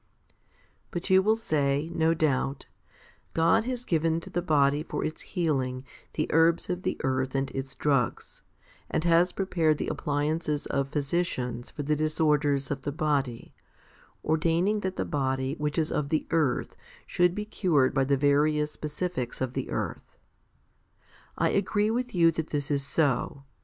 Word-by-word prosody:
5. -, -, -33 dB, 0.5 s
But 175 Hz, +2 st, -4 dB
you 190 Hz, 0 st, +7 dB
will 215 Hz, +3 st, +3 dB
say, 150 Hz, -6 st, 0 dB
no 165 Hz, -1 st, +2 dB
doubt, 140 Hz, -3 st, 0 dB, 0.7 s
"God 165 Hz, +7 st, +3 dB
has 250 Hz, -1 st, -3 dB
given 165 Hz, -2 st, +1 dB
to -, -, -10 dB
the 175 Hz, -, 0 dB
body 145 Hz, -2 st, +3 dB
for 155 Hz, -, -3 dB
its 155 Hz, -, -4 dB
healing 135 Hz, -8 st, -1 dB, 0.3 s
the 155 Hz, -, 0 dB
herbs 165 Hz, +3 st, +3 dB
of 180 Hz, 0 st, -3 dB
the -, -, -2 dB
earth 130 Hz, 0 st, 0 dB
and 135 Hz, 0 st, -1 dB
its 135 Hz, 0 st, -5 dB
drugs, 140 Hz, -6 st, -1 dB, 0.5 s
and -, -, 0 dB
has 170 Hz, +1 st, +4 dB
prepared 170 Hz, -5 st, +1 dB
the -, -, -3 dB
appliances 150 Hz, +1 st, -1 dB
of 140 Hz, 0 st, -1 dB
physicians 140 Hz, -5 st, -2 dB
for 145 Hz, -, -6 dB
the 150 Hz, +2 st, +1 dB
disorders 150 Hz, -2 st, +1 dB
of 140 Hz, -1 st, -2 dB
the 145 Hz, -, -3 dB
body, 140 Hz, -6 st, -1 dB, 0.7 s
ordaining 165 Hz, +6 st, +2 dB
that 190 Hz, -2 st, -3 dB
the -, -, -2 dB
body 135 Hz, -1 st, -1 dB
which 150 Hz, +1 st, -2 dB
is 160 Hz, -1 st, +1 dB
of 140 Hz, -1 st, -1 dB
the 155 Hz, -, 0 dB
earth 155 Hz, -6 st, +1 dB, 0.3 s
should 175 Hz, 0 st, +2 dB
be 210 Hz, -, -3 dB
cured 165 Hz, -11 st, +2 dB
by 135 Hz, 0 st, +2 dB
the 140 Hz, +1 st, +2 dB
various 150 Hz, +2 st, +2 dB
specifics 150 Hz, -4 st, -4 dB
of 130 Hz, -1 st, -2 dB
the -, -, -3 dB
earth." -, -, -5 dB, 1.2 s
I -, -, +2 dB
agree 205 Hz, +2 st, +1 dB
with 245 Hz, -1 st, -2 dB
you 165 Hz, -1 st, +5 dB
that 160 Hz, -1 st, -3 dB
this 145 Hz, 0 st, -2 dB
is 140 Hz, -1 st, +1 dB
so. 140 Hz, -1 st, 0 dB
150 Hz, 160 wpm, -27 LUFS, 140-170 Hz, 1.2 s, you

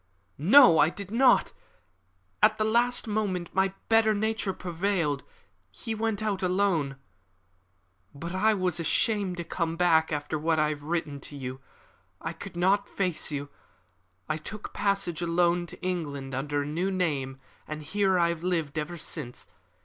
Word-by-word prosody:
"No, 195 Hz, -, +7 dB
I 155 Hz, -, +6 dB
did 200 Hz, +2 st, -8 dB
not. 250 Hz, +2 st, +4 dB, 0.9 s
At 215 Hz, 0 st, +5 dB
the 215 Hz, -, +1 dB
last 240 Hz, +3 st, +2 dB
moment 200 Hz, -5 st, -2 dB
my 190 Hz, 0 st, +2 dB, 0.2 s
better 225 Hz, -1 st, +4 dB
nature 220 Hz, -1 st, -1 dB
prevailed. 175 Hz, -5 st, -1 dB, 0.5 s
He 160 Hz, -, -5 dB
went 220 Hz, -1 st, -1 dB
alone. 185 Hz, -7 st, 0 dB, 1.2 s
But 170 Hz, +5 st, -6 dB
I 215 Hz, +3 st, +3 dB
was 180 Hz, -3 st, -1 dB
ashamed 190 Hz, +3 st, +1 dB
to 170 Hz, -, -3 dB
come 165 Hz, -1 st, -2 dB
back 165 Hz, -2 st, +3 dB
after 150 Hz, +1 st, -2 dB
what 160 Hz, +1 st, +1 dB
I 150 Hz, 0 st, +3 dB
had 150 Hz, -1 st, -4 dB
written 155 Hz, -2 st, -3 dB
to 145 Hz, +1 st, -8 dB
you. 130 Hz, 0 st, -6 dB, 0.6 s
I -, -, -4 dB
could -, -, -9 dB
not 195 Hz, +3 st, +2 dB
face 180 Hz, -5 st, -1 dB
you. 145 Hz, -1 st, -4 dB, 0.8 s
I 155 Hz, -, -1 dB
took 210 Hz, +7 st, -8 dB
passage 200 Hz, -4 st, 0 dB
alone 175 Hz, 0 st, +1 dB
to -, -, -11 dB
England 145 Hz, -7 st, -3 dB
under 145 Hz, +2 st, -1 dB
a -, -, -6 dB
new 165 Hz, +6 st, -1 dB
name, 145 Hz, -8 st, -1 dB, 0.3 s
and 155 Hz, 0 st, -6 dB
here 190 Hz, +4 st, +1 dB
I 170 Hz, -1 st, +3 dB
have 170 Hz, -1 st, -3 dB
lived 165 Hz, -4 st, -1 dB
ever 165 Hz, +3 st, -5 dB
since. 145 Hz, -6 st, -5 dB
175 Hz, 155 wpm, -28 LUFS, 155-200 Hz, 1.2 s, No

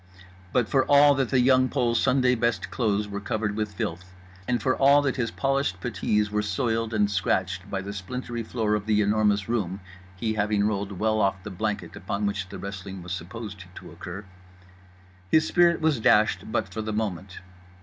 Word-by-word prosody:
But, 125 Hz, -3 st, +2 dB
for 135 Hz, +2 st, +3 dB
all 145 Hz, 0 st, +7 dB
that 135 Hz, -3 st, 0 dB
The 130 Hz, -, +3 dB
Young 130 Hz, +1 st, +4 dB
Pole's 120 Hz, 0 st, +1 dB
Sunday 130 Hz, -1 st, +3 dB
best 115 Hz, -6 st, -1 dB
clothes 105 Hz, -4 st, 0 dB
were 100 Hz, 0 st, -5 dB
covered 105 Hz, 0 st, -2 dB
with 105 Hz, -1 st, -3 dB
filth, 90 Hz, +1 st, -5 dB, 0.3 s
and 120 Hz, -1 st, +1 dB
for 130 Hz, +3 st, +1 dB
all 140 Hz, +1 st, +5 dB
that 135 Hz, -2 st, 0 dB
his 115 Hz, -3 st, 0 dB
polished 135 Hz, -9 st, -1 dB
puttees 105 Hz, -2 st, 0 dB
were 105 Hz, 0 st, +1 dB
soiled 115 Hz, +1 st, -1 dB
and 105 Hz, -2 st, +2 dB
scratched 95 Hz, 0 st, -1 dB
by 95 Hz, -1 st, -3 dB
the 100 Hz, +1 st, -6 dB
splintery 120 Hz, +4 st, -5 dB
floor 110 Hz, -1 st, -1 dB
of 105 Hz, 0 st, -2 dB
The 105 Hz, -1 st, +3 dB
Enormous 105 Hz, -1 st, +2 dB
Room 100 Hz, -5 st, -1 dB, 0.4 s
(he 110 Hz, +4 st, -2 dB
having 105 Hz, -1 st, +1 dB
rolled 100 Hz, -1 st, -2 dB
well 110 Hz, +3 st, +1 dB
off 95 Hz, -1 st, 0 dB
the 105 Hz, -, -7 dB
blanket 105 Hz, +3 st, -3 dB
upon 100 Hz, +1 st, -3 dB
which 100 Hz, -2 st, -2 dB
the -, -, -7 dB
wrestling 95 Hz, -1 st, -7 dB
was 90 Hz, -, -8 dB
supposed 100 Hz, +3 st, -6 dB
to -, -, -10 dB
occur), 95 Hz, +4 st, -8 dB, 1.0 s
his 155 Hz, +7 st, +4 dB
spirit 170 Hz, -2 st, +3 dB
was 155 Hz, -5 st, +2 dB
dashed 110 Hz, -1 st, +3 dB
but -, -, -1 dB
for 110 Hz, -, -3 dB
the 110 Hz, 0 st, -4 dB
moment. 95 Hz, -4 st, -3 dB
105 Hz, 190 wpm, -26 LUFS, 100-120 Hz, 1.0 s, all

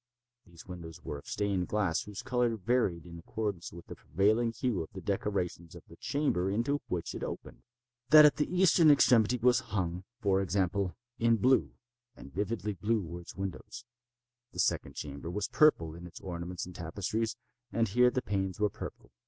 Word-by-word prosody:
These 85 Hz, -1 st, -14 dB
windows 85 Hz, -2 st, -9 dB
were 75 Hz, -, -5 dB
of -, -, -17 dB
stained 100 Hz, -3 st, -1 dB
glass 100 Hz, -6 st, 0 dB
whose 105 Hz, +3 st, -7 dB
color 125 Hz, -3 st, +1 dB
varied 100 Hz, -6 st, 0 dB
in 85 Hz, -1 st, -9 dB
accordance 100 Hz, 0 st, -4 dB
with 85 Hz, 0 st, -11 dB
the -, -, -8 dB
prevailing 110 Hz, +7 st, +1 dB
hue 115 Hz, -3 st, -1 dB
of 80 Hz, -, -6 dB
the 95 Hz, -, -6 dB
decorations 95 Hz, -4 st, -2 dB
of -, -, -11 dB
the -, -, -14 dB
chamber 120 Hz, -, 0 dB
into 120 Hz, +8 st, 0 dB
which 85 Hz, -2 st, -3 dB
it -, -, -6 dB
opened. -, -, -7 dB, 0.5 s
That 155 Hz, -1 st, +10 dB
at 150 Hz, -, +5 dB
the 150 Hz, -, 0 dB
eastern 180 Hz, -3 st, +5 dB
extremity 125 Hz, -4 st, +5 dB
was 125 Hz, +1 st, +4 dB
hung, 90 Hz, -3 st, -3 dB, 0.2 s
for 95 Hz, -4 st, +2 dB
example, 95 Hz, 0 st, 0 dB, 0.2 s
in 115 Hz, 0 st, +4 dB
blue—and 120 Hz, -, -1 dB
vividly 105 Hz, +2 st, -2 dB
blue 105 Hz, +2 st, 0 dB
were 85 Hz, +1 st, -7 dB
its 85 Hz, -, -11 dB
windows. 95 Hz, +5 st, -6 dB, 0.7 s
The -, -, -12 dB
second -, -, 0 dB
chamber 70 Hz, +2 st, -6 dB
was 100 Hz, +3 st, -2 dB
purple 85 Hz, -, +4 dB
in 85 Hz, +2 st, -9 dB
its 85 Hz, -, -11 dB
ornaments 90 Hz, 0 st, -5 dB
and 90 Hz, -, -10 dB
tapestries, 100 Hz, +7 st, -2 dB, 0.4 s
and 115 Hz, 0 st, +1 dB
here 125 Hz, +5 st, +4 dB
the 125 Hz, 0 st, -2 dB
panes 95 Hz, -1 st, -2 dB
were 105 Hz, -1 st, +2 dB
purple. -, -, -9 dB
100 Hz, 175 wpm, -31 LUFS, 90-120 Hz, 0.7 s, That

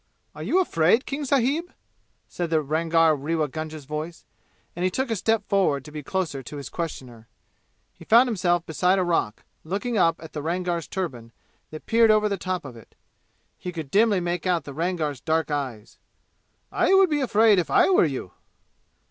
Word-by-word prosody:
"Are -, -, -10 dB
you 370 Hz, -, +1 dB
afraid, 225 Hz, -, +2 dB
King 285 Hz, +1 st, -4 dB
sahib?" 280 Hz, +6 st, +1 dB, 0.6 s
said 175 Hz, -2 st, -4 dB
the 160 Hz, -2 st, +1 dB
Rangar 160 Hz, +2 st, +2 dB
Rewa 155 Hz, +2 st, -1 dB
Gunga's 155 Hz, 0 st, -7 dB
voice, 155 Hz, +4 st, -6 dB, 0.5 s
and 175 Hz, -, -3 dB
he 185 Hz, -, +3 dB
took 260 Hz, +6 st, -2 dB
a -, -, +1 dB
step 220 Hz, +1 st, 0 dB
forward 180 Hz, -9 st, +1 dB
to 150 Hz, -, -11 dB
be 150 Hz, 0 st, -6 dB
closer 155 Hz, -3 st, -3 dB
to 140 Hz, +4 st, -9 dB
his 140 Hz, -3 st, -7 dB
questioner. 125 Hz, -9 st, -6 dB, 0.7 s
He -, -, -15 dB
found 235 Hz, +3 st, +6 dB
himself 175 Hz, -6 st, 0 dB
beside 180 Hz, +4 st, +1 dB
a 185 Hz, -, +2 dB
rock, 165 Hz, -11 st, -1 dB, 0.2 s
looking 205 Hz, +7 st, -2 dB
up 165 Hz, -2 st, +4 dB
at 160 Hz, -, -11 dB
the 150 Hz, -, -4 dB
Rangar's 170 Hz, +1 st, -2 dB
turban, 125 Hz, -12 st, -5 dB, 0.4 s
that 155 Hz, -, -10 dB
peered 230 Hz, 0 st, +4 dB
over 215 Hz, 0 st, +4 dB
the 200 Hz, -, -1 dB
top 185 Hz, -2 st, -3 dB
of 130 Hz, -3 st, -9 dB
it. 115 Hz, -, -16 dB, 0.6 s
He 180 Hz, -, -5 dB
could 160 Hz, -5 st, -7 dB
dimly 210 Hz, -1 st, +3 dB
make 175 Hz, +1 st, -2 dB
out 175 Hz, -4 st, +1 dB
the 140 Hz, -, -9 dB
Rangar's 160 Hz, -4 st, -2 dB
dark 160 Hz, -1 st, 0 dB
eyes. 130 Hz, -7 st, -5 dB, 0.7 s
"I 385 Hz, -, +3 dB
would 385 Hz, -3 st, +5 dB
be 295 Hz, -1 st, +1 dB
afraid 220 Hz, -5 st, +4 dB
if 170 Hz, -, -2 dB
I -, -, +4 dB
were 360 Hz, -, +5 dB
you!" 130 Hz, -, -4 dB
170 Hz, 185 wpm, -24 LUFS, 150-205 Hz, 0.7 s, found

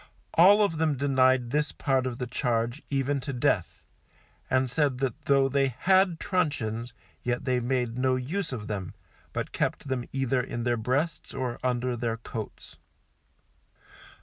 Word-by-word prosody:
All 200 Hz, +5 st, +7 dB
of 165 Hz, -6 st, 0 dB
them 155 Hz, -3 st, +1 dB
denied 130 Hz, -3 st, +3 dB
this 150 Hz, +1 st, +1 dB
part 135 Hz, -3 st, 0 dB
of 120 Hz, -2 st, -4 dB
the 125 Hz, -, -3 dB
charge, 120 Hz, +1 st, -1 dB
even 140 Hz, 0 st, 0 dB
to 140 Hz, +2 st, -5 dB
death, 125 Hz, -2 st, 0 dB, 0.7 s
and 130 Hz, 0 st, +2 dB
said 135 Hz, +1 st, +1 dB
that 130 Hz, -3 st, -3 dB
though 140 Hz, -1 st, +4 dB
they 135 Hz, 0 st, +2 dB
had 180 Hz, -, +2 dB
truncheons, 120 Hz, -, -1 dB, 0.3 s
yet 120 Hz, 0 st, -2 dB
they 130 Hz, -2 st, +2 dB
made 125 Hz, -1 st, -1 dB
no 130 Hz, 0 st, +2 dB
use 160 Hz, +8 st, -3 dB
of 115 Hz, -5 st, -5 dB
them, 100 Hz, -4 st, -5 dB, 0.4 s
but -, -, -3 dB
kept 140 Hz, -, -2 dB
them 125 Hz, -2 st, -1 dB
either 135 Hz, -1 st, +1 dB
in 120 Hz, -1 st, -4 dB
their 120 Hz, 0 st, +2 dB
breasts 130 Hz, +8 st, -2 dB
or 125 Hz, -2 st, -3 dB
under 125 Hz, 0 st, 0 dB
their 115 Hz, -1 st, -2 dB
coats. 115 Hz, -1 st, -8 dB
130 Hz, 155 wpm, -27 LUFS, 120-145 Hz, 0.7 s, All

